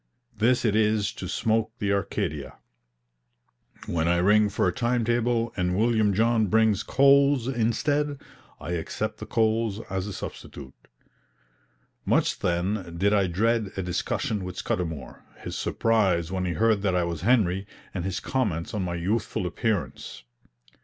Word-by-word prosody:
This 120 +4 +2
it 105 -2 +2
is 105 -1 +2
to - - -6
smoke 115 -1 0
the 100 -2 0
Arcadia. 75 -7 -3 1.3
When 80 -1 -1
I 85 0 +3
ring 105 +4 +4
for 100 - 0
a - - 0
time 120 -2 0
table 120 0 0
and 90 -1 0
William 110 -2 +3
John 115 0 +2
brings 110 0 +3
coals 140 0 +4
instead, 140 +4 0 0.4
I - - -6
accept 85 -2 -3
the - - -7
coals 110 -2 +1
as 95 0 -2
a 105 - -5
substitute. 70 -6 -8 1.3
Much, - - +1
then, 90 0 -1
did 100 +4 +2
I 100 -2 +3
dread 110 +3 0
a 95 - -1
discussion 95 +3 -2
with 90 0 -7
Scudamour, 80 -7 -4 0.2
his - - -7
surprise 95 -7 +1
when 95 -1 -1
he 90 - -1
heard 110 +2 +2
that 95 -3 +1
I 90 - +2
was 85 -2 -3
Henry, 100 -3 +2 0.3
and 90 - -3
his 95 0 -2
comments 105 - -2
on 105 - -1
my 90 -1 -2
youthful 95 +2 -1
appearance. 90 - -3
105 Hz, 150 wpm, -26 LUFS, 90-115 Hz, 1.3 s, ring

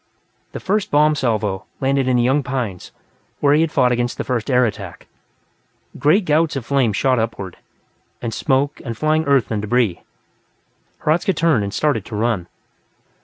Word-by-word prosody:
The - - -5
first 205 +1 -1
bomb 150 +1 +4
salvo 105 -7 -1
landed 135 0 +1
in 125 -1 +3
the 120 - +2
young 135 +4 +2
pines, 125 -9 -4 0.5
where 145 0 +3
he 150 - +4
had 165 -1 0
fought 125 -1 +3
against 120 0 -1
the - - -2
first 120 -2 -2
air 125 -1 +4
attack. 110 - -6 0.9
Great 180 +7 +3
gouts 155 -1 +2
of 135 -4 -4
flame 135 -5 +2
shot 130 +4 +1
upward, 100 -5 -4 0.6
and 115 -2 -4
smoke, 140 +4 0
and 115 -3 -5
flying 155 +2 +1
earth 140 -5 +2
and 105 -2 -1
debris. 105 -3 0 1.0
Hradzka 170 +5 +1
turned 155 -9 +2
and 100 - -3
started 140 -4 0
to 110 - -7
run. 105 -5 -1
130 Hz, 170 wpm, -20 LUFS, 110-150 Hz, 1.0 s, bomb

